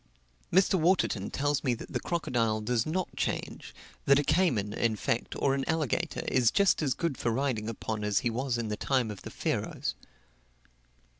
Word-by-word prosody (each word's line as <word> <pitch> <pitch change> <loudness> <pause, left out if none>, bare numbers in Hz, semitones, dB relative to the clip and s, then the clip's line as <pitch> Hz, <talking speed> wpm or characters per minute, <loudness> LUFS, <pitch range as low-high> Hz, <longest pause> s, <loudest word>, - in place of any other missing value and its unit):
Mr. 190 +1 +4
Waterton 155 - +2
tells 145 0 0
me 125 -2 +1
that - - -10
the - - 0
crocodile 115 -10 0
does 115 +3 0
not 180 +3 -2
change - - -3 0.3
that 140 - +6
a 145 - +2
cayman, 125 - +2
in 115 -2 +1
fact, 115 +2 -2
or 135 - +2
an 135 0 0
alligator, 160 +1 -1
is 125 -3 +4
just 200 +3 +3
as 135 -5 +1
good 165 -6 -2
for - - 0
riding 115 -3 -1
upon 110 -1 -4
as 105 -1 +1
he 120 - +1
was 125 +1 -1
in 115 -2 -3
the 105 - -1
time 130 -5 0
of 100 - -9
the - - -8
Pharaohs. - - -2
125 Hz, 180 wpm, -29 LUFS, 110-155 Hz, 0.3 s, that